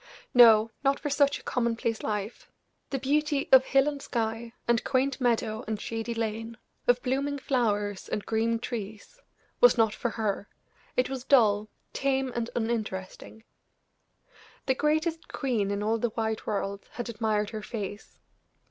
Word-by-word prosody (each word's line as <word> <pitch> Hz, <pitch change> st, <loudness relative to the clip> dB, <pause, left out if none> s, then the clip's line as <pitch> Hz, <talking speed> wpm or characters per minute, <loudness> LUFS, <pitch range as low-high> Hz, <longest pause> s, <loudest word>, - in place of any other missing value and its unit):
No, 225 Hz, -2 st, +7 dB
not 275 Hz, 0 st, +2 dB
for 290 Hz, -, -3 dB
such 285 Hz, 0 st, +3 dB
a -, -, -15 dB
commonplace 230 Hz, -2 st, -1 dB
life. 210 Hz, +1 st, -4 dB, 0.4 s
The 275 Hz, -, -1 dB
beauty 285 Hz, +2 st, 0 dB
of 265 Hz, 0 st, +8 dB
hill 270 Hz, +1 st, +3 dB
and 285 Hz, -2 st, -3 dB
sky, 230 Hz, -1 st, -3 dB, 0.2 s
and 235 Hz, -1 st, +2 dB
quaint 265 Hz, 0 st, 0 dB
meadow 225 Hz, -3 st, 0 dB
and 215 Hz, -1 st, -2 dB
shady 230 Hz, +2 st, -4 dB
lane, 225 Hz, +1 st, -3 dB, 0.3 s
of 245 Hz, 0 st, +3 dB
blooming 280 Hz, +3 st, -1 dB
flowers 210 Hz, -7 st, -1 dB
and 210 Hz, -, -3 dB
green 230 Hz, +1 st, +1 dB
trees, 225 Hz, -, -7 dB, 0.4 s
was -, -, +6 dB
not 220 Hz, -2 st, +3 dB
for 240 Hz, -, -2 dB
her; 210 Hz, -3 st, -2 dB, 0.5 s
it 250 Hz, -, +3 dB
was 265 Hz, -2 st, -5 dB
dull, 215 Hz, -6 st, +4 dB, 0.2 s
tame 270 Hz, -1 st, 0 dB
and 235 Hz, 0 st, -2 dB
uninteresting. 220 Hz, -2 st, -4 dB, 1.2 s
The 265 Hz, -, +3 dB
greatest 315 Hz, +4 st, 0 dB
queen 235 Hz, -8 st, -1 dB
in 200 Hz, 0 st, -2 dB
all 225 Hz, +2 st, +1 dB
the 240 Hz, -, 0 dB
wide 220 Hz, -1 st, -2 dB
world 200 Hz, -1 st, -3 dB
had 240 Hz, -, -5 dB
admired 215 Hz, -2 st, -1 dB
her 215 Hz, -1 st, -5 dB
face. 205 Hz, -2 st, -6 dB
230 Hz, 150 wpm, -28 LUFS, 215-265 Hz, 1.2 s, of